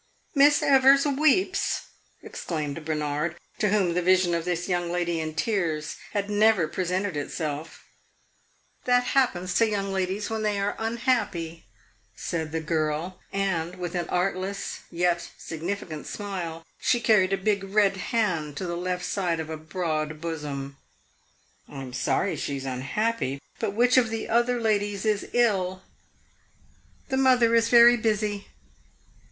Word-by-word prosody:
"Miss 290 0 +5
Evers 275 +1 +6
weeps!" 310 +7 +2 0.4
exclaimed 155 -2 -4
Bernard, 150 +2 -2 0.2
to 210 - +2
whom 195 -4 +2
the 180 - +1
vision 185 0 +3
of 170 -1 -1
this 175 -1 -2
young 175 -2 -1
lady 175 -1 -1
in 155 -1 -4
tears 165 -8 -1 0.2
had 200 -1 -1
never 210 -4 +3
presented 185 +2 -2
itself. 150 +1 -4 1.0
"That 245 0 +4
happens 185 -9 +1
to 230 +2 +3
young 200 -2 -2
ladies 190 +2 -1
when 220 0 -3
they 210 -2 0
are 200 +1 -1
unhappy," 225 - -1 0.5
said 160 +6 -3
the 160 0 -2
girl; 160 +3 -2
and 185 -3 -1
with 180 -2 -5
an 175 -2 -2
artless 190 +2 -2
yet 175 0 0
significant 165 -1 -5
smile 175 -5 -5
she 240 - +2
carried 210 -5 +3
a 195 - +2
big 200 0 0
red 195 0 +2
hand 180 -9 -1
to 190 - -3
the 170 -1 -3
left 180 +1 -2
side 175 -4 -1
of 160 0 -5
a - - -3
broad 155 -2 -3
bosom. 145 -4 -5 0.9
"I 135 -2 -7
am 125 -1 -9
sorry 155 +9 0
she 140 - -3
is 135 - -6
unhappy; 140 - -1 0.2
but 205 -3 -2
which 245 +3 +4
of 240 -3 +4
the 225 0 -4
other 240 +1 +2
ladies 205 -2 0
is 210 -2 0
ill?" 190 -6 +1 1.3
"The 265 - 0
mother 250 -3 +4
is 230 0 +4
very 240 0 +8
busy." 210 -2 -1
185 Hz, 145 wpm, -26 LUFS, 165-220 Hz, 1.3 s, very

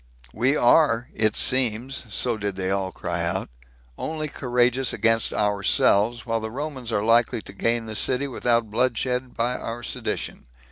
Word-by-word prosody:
We 130 +6 +2
are, 120 -2 +4
it 110 -1 +1
seems, 125 0 0
[so 120 +2 0
did 100 -2 -3
they 95 0 -2 0.2
cry - - -3
out,] - - -2 0.5
only 155 -1 -3
courageous 125 -1 +1
against 115 -1 +1
ourselves, 105 +2 +2
while 115 -1 0
the 110 0 -4
Romans 130 -1 -5
are 105 -2 0
likely 115 0 +3
to - - -11
gain 115 +3 0
the 110 0 -6
city 130 +6 +1
without 120 -3 0
bloodshed 125 +2 0
by 120 +2 0
our 120 +1 -6
sedition." 65 - -4
120 Hz, 150 wpm, -24 LUFS, 110-125 Hz, 0.5 s, are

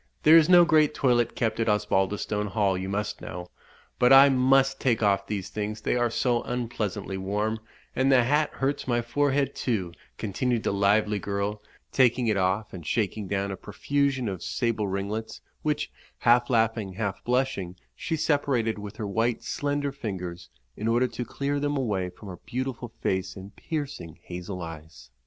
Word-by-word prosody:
There 155 +2 +8
is 165 0 +6
no 175 -1 +8
great 155 -2 +3
toilette 120 -3 +2
kept 110 -2 -1
at 115 0 +1
Osbaldistone 105 +1 0
Hall, 100 -1 +1
you 95 +1 -4
must 105 +1 -3
know; 90 0 -7 0.5
but 125 - +5
I 135 +1 +9
must 135 +1 +3
take 120 -4 +1
off 100 -1 +2
these 100 -2 -3
things, 105 0 -4
they - - 0
are 120 -1 +2
so 120 +1 +1
unpleasantly 110 -5 -3
warm, 105 +3 -1 0.4
and 130 +1 +3
the 130 -2 +6
hat 150 +4 +2
hurts 135 +1 -2
my 120 -1 +1
forehead, 140 +2 +1
too," 100 -9 -2 0.3
continued 115 +3 -1
the - - 0
lively 105 +1 +2
girl, 100 +1 -3 0.3
taking 125 -1 +3
it 110 -2 +2
off, 95 +3 0
and 90 -3 -7
shaking 105 +3 -1
down 100 +1 -1
a - - -3
profusion 135 +5 -1
of 95 -4 -4
sable 115 -4 -1
ringlets, 100 +3 -4 0.2
which, 150 -1 -1 0.3
half 120 0 +3
laughing, 115 -4 +1
half 100 -1 -3
blushing, 125 -8 -1 0.2
she 160 - -2
separated 140 -8 0
with 105 0 -8
her 110 - -4
white 115 +4 0
slender 145 0 -1
fingers, 90 -9 -6 0.3
in 110 - -3
order 120 +2 +3
to 120 - -4
clear 140 +4 -2
them 145 0 -1
away 100 -8 -1
from 95 +4 -13
her 90 -2 -7
beautiful 125 +1 -5
face 95 0 -1
and 100 +1 -11
piercing 145 - -5
hazel 90 +1 -6
eyes. 75 -6 -10
110 Hz, 170 wpm, -26 LUFS, 100-130 Hz, 0.5 s, I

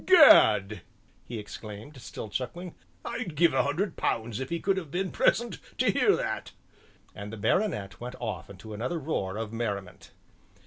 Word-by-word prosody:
"Gad!" 110 - +7 0.5
he 120 - -5
exclaimed, 105 +5 -9
still 110 - -7
chuckling, 155 - -5 0.3
"I'd 190 -10 -4
give 170 +2 +4
a - - +4
hundred 165 +7 -1
pounds 115 0 -1
if 130 - -4
he 170 - -1
could 195 +2 +1
have 170 -6 -4
been 185 +5 -2
present 235 -5 +2 0.2
to - - +3
hear - - +4
that," - - -3 0.6
and 100 +1 -7
the 115 - -7
baronet 105 - 0
went 125 +1 -6
off 110 -4 -4
into 100 +3 -10
another 125 +11 -2
roar 110 -11 -2
of 110 0 -4
merriment. 100 -5 -4
120 Hz, 165 wpm, -28 LUFS, 105-170 Hz, 0.6 s, Gad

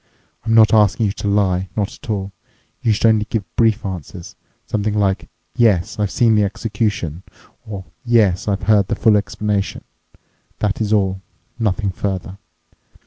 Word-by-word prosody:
I'm 115 0 +1
not 110 -2 +6
asking 105 0 +4
you 100 - +1
to 105 - -5
lie, 95 -2 +1
not 100 -2 -1
at - - -14
all. 100 -2 -2 0.5
You 115 - +2
should 110 - +1
only 110 -2 +4
give 110 -3 -1
brief 115 -2 +2
answers—something 95 +4 -5
like, 100 -2 0 0.3
'Yes, 105 -7 +2
I've 105 -2 +1
seen 115 +2 +3
the 105 -1 +3
execution' 100 -5 -2 0.5
or 100 -3 -6 0.2
'Yes, 110 -7 +2
I've 100 -2 -1
heard 100 -1 +3
the - - -1
full 110 -2 +4
explanation.' 105 -1 -1 0.7
That's 105 0 -1
all—nothing 100 +1 -2
further. 95 0 -4
105 Hz, 140 wpm, -19 LUFS, 95-110 Hz, 0.7 s, not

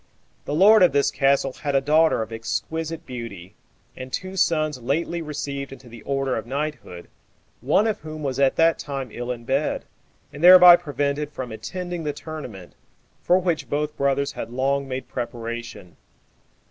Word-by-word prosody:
The 145 - -2
lord 210 +5 +6
of 180 -5 +5
this 140 0 +2
castle 135 -1 +1
had 145 0 -3
a - - +5
daughter 155 -2 +3
of 110 +1 -10
exquisite 160 +8 -4
beauty, 115 -8 -8 0.4
and 130 0 -8
two 185 +5 -5
sons 155 -7 +1
lately 165 +7 -1
received 140 -3 -5
into 135 -1 -12
the 115 -1 -12
order 135 +1 -1
of 110 0 -5
knighthood, 140 - -5 0.5
one 150 - +2
of 220 -2 -1
whom 155 0 -8
was 135 -1 -2
at 135 -1 +3
that 165 0 +3
time 135 -3 -5
ill 120 +2 -5
in 120 -1 -6
bed, 135 +4 -1 0.5
and 145 +4 -8
thereby 180 -1 +10
prevented 145 -2 -2
from 130 -4 -6
attending 175 +10 -5
the 150 -1 -2
tournament, 140 - -9 0.5
for 180 - +3
which 175 -3 -1
both 150 +1 -2
brothers 140 0 0
had 115 - -6
long 135 +3 -1
made 130 -1 -5
preparation. 115 -6 -6
140 Hz, 165 wpm, -23 LUFS, 125-155 Hz, 0.5 s, thereby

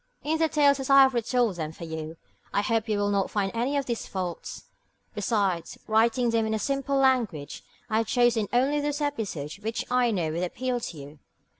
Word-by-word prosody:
In 315 +2 0
the 320 -1 +3
tales 285 -3 +4
as 270 - -4
I 275 0 +8
have 265 0 +3
retold 235 -4 +1
them 155 -2 -3
for 170 - -10
you, 160 0 -6 0.3
I 200 - +1
hope 225 0 0
you 210 - +1
will 205 0 +1
not 200 -1 +1
find 195 -2 -1
any 250 +5 0
of 280 - -1
these 235 -2 -3
faults. 180 -3 -5 0.5
Besides 200 -5 -1
writing 230 +2 +2
them 225 -1 +1
in 220 0 0
simple 275 +3 -1
language, 245 - +1 0.2
I 220 -1 +1
have 225 - -1
chosen 240 -4 +2
only 270 +4 +2
those 290 0 -2
episodes 205 - -3
which 220 +2 -3
I 250 -1 +3
know 175 -8 -1
would 165 +2 -2
appeal 245 +7 -2
to 175 -8 -6
you. 145 +1 -11
225 Hz, 200 wpm, -27 LUFS, 195-260 Hz, 0.5 s, I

